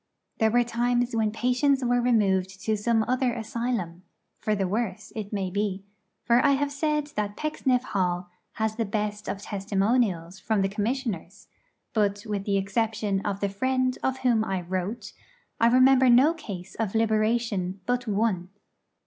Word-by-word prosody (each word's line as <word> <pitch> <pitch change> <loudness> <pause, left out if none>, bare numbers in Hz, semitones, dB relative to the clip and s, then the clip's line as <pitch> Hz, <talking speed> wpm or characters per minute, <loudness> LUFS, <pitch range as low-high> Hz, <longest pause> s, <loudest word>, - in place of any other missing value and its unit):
There 220 - +4
were 240 +2 +3
times 240 +1 0
when 220 -2 +1
patients 250 +4 +1
were 245 0 +2
removed 195 -6 +1
to 220 - +2
some 220 +1 +1
other 255 -1 +1
asylum 225 -6 -3 0.4
for 215 - 0
the 195 -2 0
worse, 210 0 -3
it 210 -2 -5
may 195 -3 -2
be; 200 -1 -2 0.4
for 240 +1 +4
I 285 -1 +5
have 285 +1 0
said 300 0 -1
that 205 -1 -2
Pecksniff 265 -5 0
Hall 180 -4 -1 0.2
has 220 -1 -2
the 230 - 0
best 210 0 -3
of 200 - -4
testimonials 195 -3 0
from 210 -2 0
the 195 - +1
Commissioners; 210 - -3 0.4
but, 205 -1 0
with 205 -2 -3
the 200 -1 +1
exception 205 0 0
of 200 -1 -3
the 200 - +2
friend 255 +5 0
of 265 0 0
whom 230 -3 +4
I 195 -4 -2
wrote, 190 +5 -4 0.5
I 230 - +5
remember 255 +1 +6
no 260 +7 +6
case 195 - -8
of 225 -2 -3
liberation 215 -4 +1
but 245 0 -1
one. 200 -4 0
220 Hz, 160 wpm, -26 LUFS, 195-245 Hz, 0.5 s, remember